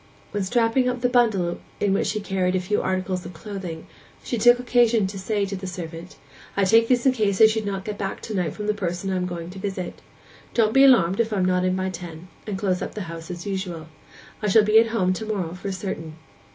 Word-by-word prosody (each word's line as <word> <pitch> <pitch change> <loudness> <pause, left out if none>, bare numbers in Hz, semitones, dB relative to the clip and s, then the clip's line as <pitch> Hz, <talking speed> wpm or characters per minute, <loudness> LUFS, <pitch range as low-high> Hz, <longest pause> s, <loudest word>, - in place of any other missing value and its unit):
When 205 - -2
strapping 235 +5 +2
up 250 -1 -3
the 245 - +2
bundle 220 -8 +2 0.2
in 200 -1 +2
which 195 - +1
she 215 - -1
carried 190 -2 0
a - - +2
few 185 +3 0
articles 185 -1 -2
of - - -9
clothing, 185 -4 -7 0.4
she 250 - -2
took 240 +2 +6
occasion 240 -3 +3
to 195 +1 -5
say 205 +1 -1
to 195 0 -4
the 190 0 -6
servant, 170 0 -7 0.4
'I 200 - +3
take 225 +4 +5
these 245 0 +2
in 265 - +6
case 210 -6 0
I 220 - +9
should 220 -1 +1
not 195 -1 -3
get 210 -1 -5
back 195 -1 -3
to 220 - -6
night 180 -6 -1
from 210 - -6
the 210 - +1
person 190 -1 -3
I - - 0
am 180 0 -1
going 170 -1 -6
to 190 - -9
visit. 190 -2 -5 0.5
Don't 220 -2 +3
be 270 - +6
alarmed 195 -8 +5
if 230 -1 +1
I 210 - -1
am 185 - +2
not 180 0 +2
in 185 0 +1
by 190 0 -2
ten, 175 -1 -9 0.2
and 205 -2 -3
close 190 -2 0
up - - -5
the 210 - -4
house 165 -2 -7
as 175 -1 -6
usual. 185 -5 -4 0.5
I 210 - -1
shall 215 +2 +6
be 215 +1 +6
at 230 - +4
home 190 -5 +1
to 220 +4 -5
morrow 190 -6 -2
for 185 +2 -5
certain. 175 -5 -5
195 Hz, 245 wpm, -24 LUFS, 180-220 Hz, 0.5 s, I